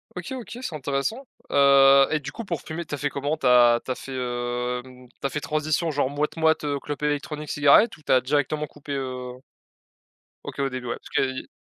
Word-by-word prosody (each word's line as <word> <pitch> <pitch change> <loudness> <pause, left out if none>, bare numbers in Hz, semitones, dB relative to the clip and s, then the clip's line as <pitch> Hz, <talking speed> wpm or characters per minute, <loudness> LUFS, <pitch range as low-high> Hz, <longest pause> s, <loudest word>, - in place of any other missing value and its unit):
OK, 180 +7 -6
OK, 245 -1 -7
c'est 160 - -4
intéressant, 140 - -2 0.2
heu 140 -1 +6
et, 155 - +1
du 150 0 -7
coup, 230 - -7
pour 170 -7 -4
fumer, 170 +2 -5
tu 150 - -5
as - - -8
fait 145 +1 -1
comment, 145 +3 -2
tu - - -6
as 120 -1 +6
tu 130 - -3
as - - -1
fait, 135 - -9
hem, 125 0 -4
tu 120 - -30
as - - -6
fait 150 - -3
transition 155 +2 -1
genre 140 -2 0
moit 145 +1 0
moit, 160 -1 +3
heu, 145 -1 -1
clope 145 +1 -6
électronique, 150 0 -2
cigarette 145 +10 +5
ou 155 - -20
tu - - -3
as 130 - +6
directement 145 +2 0
coupé, 145 0 -9
heu? 130 -2 -4 1.1
OK, - - -8
au 135 - +1
début, 125 -1 -6
ouais. - - -2
Parce - - -14
qu'il 130 -1 0
y - - -7
140 Hz, 225 wpm, -24 LUFS, 130-150 Hz, 1.1 s, heu